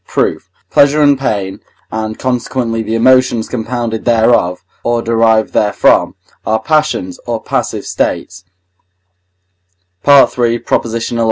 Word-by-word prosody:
Proof. - - -2 0.2
Pleasure 145 +2 +4
and 145 -1 +4
pain, 100 -7 -2 0.3
and 110 0 -4
consequently 125 -2 -2
the 110 +1 -3
emotions 130 -1 +3
compounded 115 -1 -3
thereof, 110 -7 +2 0.2
or 120 0 0
derived 115 -1 +2
therefrom, 105 -1 +2 0.3
are 110 0 0
passions, 150 - -1
or - - -2
passive - - -3
states 90 +1 -3 1.6
(III. 125 -4 +4 0.4
xi. 115 +1 -3
115 Hz, 105 wpm, -14 LUFS, 110-130 Hz, 1.6 s, Pleasure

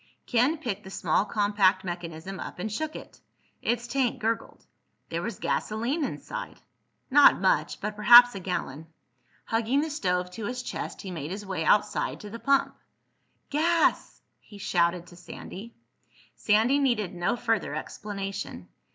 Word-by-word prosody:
Ken 250 +6 +2
picked 215 -9 -4
the 190 - -10
small 185 0 +1
compact 205 -2 +2
mechanism 175 +1 -6
up - - -7
and 205 +4 -4
shook 310 +8 -3
it. - - -11 0.4
Its 235 0 -1
tank 250 0 0
gurgled. 225 +1 -3 0.4
There - - -2
was - - -4
gasoline 235 +9 -1
inside! - - -6 0.5
Not 290 +1 +7
much—but 215 - 0
perhaps 240 +3 +8
a 195 - -5
gallon. 160 -4 -4 0.6
Hugging 230 +5 +1
the 315 0 -3
stove 180 -9 -1
to 215 +3 -6
his 250 0 -4
chest - - -6
he 190 - -6
made 155 -4 -5
his 200 +3 -6
way 185 -4 -3
outside 210 +5 +1
to 210 - -9
the 230 - -7
pump. 275 +1 +2 0.8
"Gas!" 330 +3 +1 0.2
he 205 - -15
shouted 175 -2 +1
to 175 - -15
Sandy. 190 +5 -10 0.6
Sandy 225 +7 +3
needed 235 -9 0
no 175 +5 0
further 230 -2 -1
explanation. 195 - -6
210 Hz, 145 wpm, -27 LUFS, 185-245 Hz, 0.8 s, perhaps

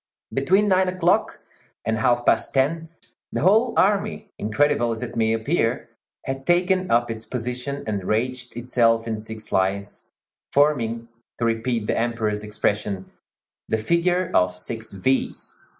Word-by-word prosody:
Between 190 +10 +3
nine 190 -1 +3
o'clock 180 -1 +1 0.4
and 110 0 0
half 120 +1 +2
past - - +2
ten 160 +5 +1 0.4
the - - -2
whole 220 +6 +4
army, 205 +2 +1
incredible 120 +3 +2
as 115 +2 -4
it 120 -1 -6
may 110 -1 +2
appear, 115 +1 0 0.4
had 135 0 -4
taken 185 +1 +2
up 120 0 +2
its 110 0 -6
position 125 +4 -4
and 105 -3 -2
ranged 125 +4 -2
itself 115 -2 +2
in 110 -1 -2
six 110 0 -7
lines, 100 +2 -1 0.4
forming, 120 -6 +2 0.3
to 115 - -1
repeat 115 0 0
the - - 0
Emperor's 115 -3 -1
expression, 105 -2 -2 0.6
"the 110 - +2
figure 170 +8 +1
of 90 0 +3
six 110 +5 -5
V's." 130 +7 -1
120 Hz, 140 wpm, -23 LUFS, 110-150 Hz, 0.6 s, whole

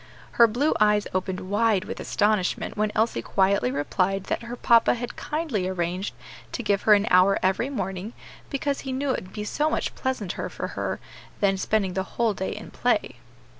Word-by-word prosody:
Her 235 - +6
blue 255 +8 +1
eyes 210 -1 +4
opened 185 0 -2
wide 205 +1 +1
with 225 - -6
astonishment 210 -3 0
when 210 0 0
Elsie 225 +1 +1
quietly 190 -9 +2
replied 185 +8 0
that - - -2
her 235 +1 -6
papa 235 -1 +4
had 245 0 -5
kindly 300 - -2
arranged 180 +1 -2 0.4
to 245 - -3
give 200 -2 +1
her 210 - +10
an 205 0 +1
hour 185 +1 +6
every 190 +7 +1
morning, 195 -3 -4 0.4
because 280 0 -1
he 265 - -5
knew 270 +1 -1
it 220 - -2
would 185 - -15
be 210 - -4
so 295 +8 0
much - - -1
pleasanter 255 -9 -3
for - - -5
her - - -3 0.4
than 195 -1 +3
spending 195 -1 0
the 190 - 0 0.2
whole 230 -2 +2
day 190 -1 -3
in - - -9
play. - - 0
210 Hz, 185 wpm, -25 LUFS, 190-235 Hz, 0.4 s, her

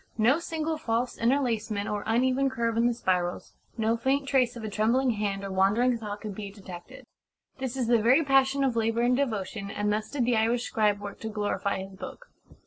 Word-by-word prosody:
No 240 +8 +4
single 320 -2 -3
false 235 -3 -1
interlacement 230 -5 0
or 205 -1 -2
uneven 255 +4 +2
curve 235 -3 -1
in 230 +1 +3
the 240 - +1
spirals, 180 -5 -1 0.2
no 225 0 +1
faint 270 +4 0
trace 255 -3 +2
of 235 - -8
a - - -3
trembling 230 +5 +2
hand 205 -2 -2
or 195 - -5
wandering 205 +7 +3
thought 210 -2 -6
can 215 - -5
be 200 0 -6
detected. 190 -3 -11 0.5
This 260 0 -3
is 255 - 0
the 235 -1 +3
very 255 +8 +5
passion 270 0 +3
of 260 -3 +1
labour 225 0 +1
and 245 +1 +3
devotion, 215 -6 -2
and 205 +1 -1
thus 215 0 -2
did 270 -5 -1
the 240 0 +2
Irish 230 +2 +1
scribe 210 -3 +1
work 205 0 -8
to 220 - -5
glorify 205 -2 -2
his 195 0 -11
book." - - -10
230 Hz, 205 wpm, -27 LUFS, 205-255 Hz, 0.5 s, very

